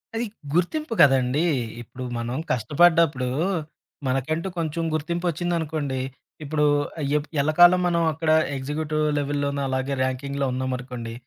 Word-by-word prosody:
అది 230 +2 -1 0.3
గుర్తింపు 230 - 0
కదండీ. 135 +2 +4 0.4
ఇప్పుడు 125 +2 -9
మనం 120 +2 -3
కష్టపడ్డప్పుడు 150 +2 +3 0.8
మనకంటూ 155 +7 -1
కొంచెం 165 0 -2
గుర్తింపు 170 +3 -2
వచ్చిందనుకోండి, 160 -5 -2 0.4
ఇప్పుడు 150 0 +1 0.4
ఆహ్, 140 - -1
ఎప్ 150 - -4
ఎల్లకాలం 175 +5 +6
మనం 170 -1 +1
అక్కడ 160 +1 0 0.3
ఎగ్జిక్యూటివ్ 155 +3 -2 0.2
లెవెల్‌లోనో 140 0 -1
అలాగే 130 +1 -1
ర్యాంకింగ్‌లో 140 +2 -2
ఉన్నామనుకోండి. 125 -2 -4
145 Hz, 110 wpm, -24 LUFS, 130-165 Hz, 0.8 s, ఎల్లకాలం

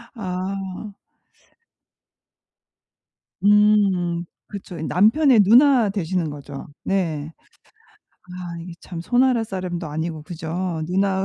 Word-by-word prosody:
아. 190 0 -5 2.5
음 200 -4 +3 0.2
그쵸. 185 -4 -8
이 - - -4
남편의 225 - +4
누나 240 +2 +5
되시는 180 -4 -1
거죠. 145 -1 -8 0.2
네. 160 -6 -1 1.0
아 180 -1 -7
이게 175 +1 -8
참 170 -3 -7
손아랫사람도 195 -7 0
아니고 160 +1 -4
그죠? 165 +1 -4
누나 190 +1 +1
185 Hz, 175 characters per minute, -22 LUFS, 170-205 Hz, 2.5 s, 누나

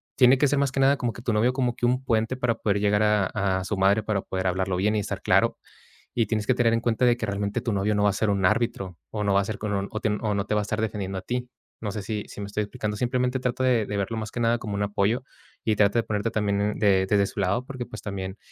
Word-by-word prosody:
tiene 130 0 +6
que 145 - +3
ser 140 +1 +1
más 140 -2 +1
que 135 - -1
nada 140 +1 +4
como 120 -3 -2
que 115 - -10
tu 120 - -1
novio 115 +4 +2
como 125 -3 0
que 120 - -1
un 125 +2 +1
puente 115 0 0
para 125 -2 0
poder 100 -2 0
llegar 105 0 +2
a 105 -3 +3 0.3
a - - -4
su 100 +2 -3
madre 100 +3 +3
para 105 -2 -1
poder 95 0 -3
hablarlo 95 +1 0
bien 105 +4 +1
y 105 - +2
estar 100 - -4
claro. - - +3 0.6
Y 115 -3 +2
tienes 110 -1 -1
que - - +4
tener 120 -2 +3
en 115 - +2
cuenta 120 +1 0
de 120 -1 +4
que 115 - -2
realmente 100 0 -2
tu 115 - -1
novio 100 +2 +1
no 105 - +2
va 105 - +5
a - - -5
ser 105 +2 0
un 100 -2 +1
árbitro, 105 -4 0
o 105 -1 -2
no 100 - +2
va 100 - +4
a - - -3
ser 105 0 -4
con 105 -1 -2
o 100 0 -1
o 110 - -3
te - - 0
o 105 0 -1
no 100 0 -1
te 105 - -1
va 105 - +2
a - - -2
estar 110 +1 -3
defendiendo 100 -3 -3
a - - -4
ti. 125 +4 -3 0.3
No 105 -2 -3
sé 105 - -4
si 105 0 -3
si - - -8
me 100 - -4
estoy 105 +1 -2
explicando, 105 -1 -4
simplemente 125 +2 0
trato 125 +1 -1
de 120 -4 +3
de 105 - -3
verlo 100 +3 -2
más 110 -1 -4
que - - -5
nada 115 0 +2
como 105 -3 -5
un 100 - -2
apoyo, 105 +4 0 0.4
y 110 - +2
trata 105 +2 +3
de - - 0
ponerte 105 +1 -2
también 105 0 0
de 95 -3 +4
desde 100 0 +3
su - - -7
lado 100 +7 0
porque 130 -2 -6
pues, 125 - -9
también 95 -1 -5
105 Hz, 300 wpm, -25 LUFS, 100-120 Hz, 0.6 s, tiene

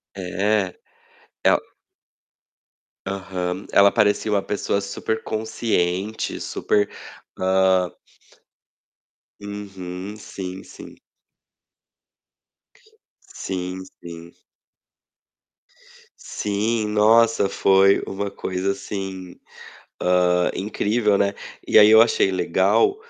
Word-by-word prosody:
É. 95 +1 -1 0.7
Ela - - +5 1.5
Aham. 95 -1 -4
Ela 100 0 +6
parecia 105 +1 +1
uma 100 -1 +2
pessoa 100 0 -1
superconsciente, 110 -1 -2
super, 105 0 0 0.5
hã 95 -1 +2 1.5
Uhum. 100 -1 -7
Sim, 95 -2 -8
sim. - - -13 2.3
Sim, 95 0 -5 0.2
sim. 85 0 -10 1.9
Sim. 105 +2 -2
Nossa, 110 -1 +4
foi 95 0 +4
uma 100 +1 -4
coisa 95 0 -3
assim, 95 -2 -6 0.6
hã, 90 0 +2
incrível, 105 +1 0
né. 100 0 +1 0.3
E - - +5
aí 105 +1 +8
eu 110 - +8
achei 115 -4 +2
legal 95 - +2
100 Hz, 75 wpm, -22 LUFS, 95-105 Hz, 2.3 s, aí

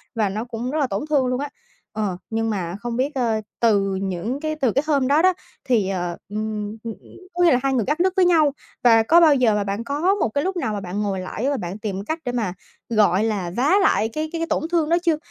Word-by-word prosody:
và 215 -3 +1
nó 215 +4 -3
cũng 245 +1 -4
rất 310 - -1
là 275 - +2
tổn 200 +4 -3
thương 285 -4 +3
luôn 250 0 -1
á. 285 0 -3 0.5
Ờ, 195 -4 -1
nhưng 225 0 -1
mà 180 -4 -3
không 240 0 -4
biết, 275 +4 0
ơ, 230 -4 0 0.2
từ 200 -4 +2
những 190 +6 -3
cái 310 0 -2
từ 270 -6 +1
cái 275 +7 +1
hôm 280 -4 +2
đó 290 +3 +4
đó 370 +1 +5 0.3
thì, 220 -7 +1
ờ, 175 -2 -3
ừm, 215 0 -4
ừm, 230 -1 -4
ừm, - - -18 0.2
có 355 0 +1
nghĩa 340 - +6
là 250 - +4
hai 270 -1 +1
người 235 -5 +1
cắt 300 +4 -1
đứt 370 +1 +2
với 375 -2 +4
nhau 320 -5 +4 0.3
và 225 -2 +6
có 330 +9 +6
bao 310 -4 +6
giờ 235 -5 +3
mà 205 - 0
bạn 200 +3 -3
có 295 +10 +1
một 305 - 0
cái 285 +6 -1
lúc 380 +1 -2
nào 220 -11 -1
mà 205 - -2
bạn 190 +2 -4
ngồi 200 -2 -1
lại 215 +8 -3
và 285 - 0
bạn 180 -2 -5
tìm 200 -2 -4
cách 320 +1 -3
để 245 - -1
mà, 220 -7 -2 0.4
gọi 210 -3 +3
là, 200 -6 -1
vá 280 +9 +3
lại 225 - +2
cái 310 0 -2
cái 335 - -4
cái 330 - -1
tổn - - 0
thương 325 -3 +1
đó 340 - +4
chưa? 325 -3 +2
235 Hz, 270 wpm, -22 LUFS, 205-295 Hz, 0.5 s, nghĩa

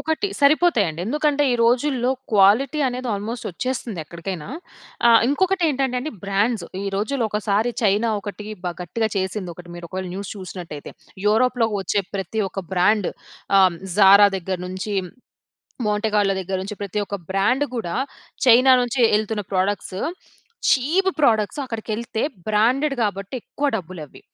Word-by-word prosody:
ఒకటి, 320 +5 -1
సరిపోతాయి 285 - +4
అండి. 160 +1 -6
ఎందుకంటే 295 +3 +1
ఈ - - +2
రోజుల్లో 250 +1 +2 0.2
క్వాలిటీ 220 +9 +4
అనేది 250 0 -4
ఆల్మోస్ట్ 220 +4 -5
వచ్చేస్తుంది 235 0 -4
ఎక్కడికైనా. 170 +1 -6 0.6
ఆహ్, 230 -1 +7
ఇంకొకటి 375 +5 +1
ఏంటంటే 265 -3 0
అండి, 310 +5 -4
బ్రాండ్స్. 200 +1 0 0.2
ఈ - - -3
రోజుల్లో 230 +4 0
ఒకసారి 210 +2 0
చైనా, 210 +2 +2
ఒకటి 205 +1 -7 0.2
బా 175 - -1
గట్టిగా 220 +6 -1
చేసింది, 190 0 -2
ఒకటి. 175 +1 -12
మీరు 175 0 -8
ఒకవేళ 185 +1 -5
న్యూస్ 195 0 -5
చూసినట్టయితే. 180 -5 -8 0.3
యూరోప్‌లో‌కి 225 0 +2
వచ్చే 200 +2 0
ప్రతి 195 +3 -2
ఒక్క 195 - -5
బ్రాండ్ 195 +2 +3 0.5
ఆహ్, 185 -2 +5 0.2
'జారా' 200 0 +8
దగ్గర 185 0 -3
నుంచి, 185 +3 -4 0.9
'మాంటే 210 +1 0
కార్లో' 195 -2 +2
దగ్గర 190 +1 -3
నుంచి 205 +2 -6
ప్రతి 200 +1 -3
ఒక్క 200 - -4
బ్రాండ్ 210 +9 +2
కూడా, 175 -7 -3 0.5
చైనా 255 +2 +7
నుంచి 245 +1 -2
వెళ్తున్న 215 0 0
ప్రొడక్ట్స్, 190 0 -1 0.7
చీప్ 325 +9 +2
ప్రొడక్ట్స్ 225 0 +2
అక్కడికెళ్తే 225 -1 -4 0.3
బ్రాండెడ్, 250 +7 +2
కాబట్టి 200 +1 -4
ఎక్కువ 290 - -3
డబ్బులు 185 -3 -7
అవి. - - -16
210 Hz, 145 wpm, -22 LUFS, 195-250 Hz, 0.9 s, జారా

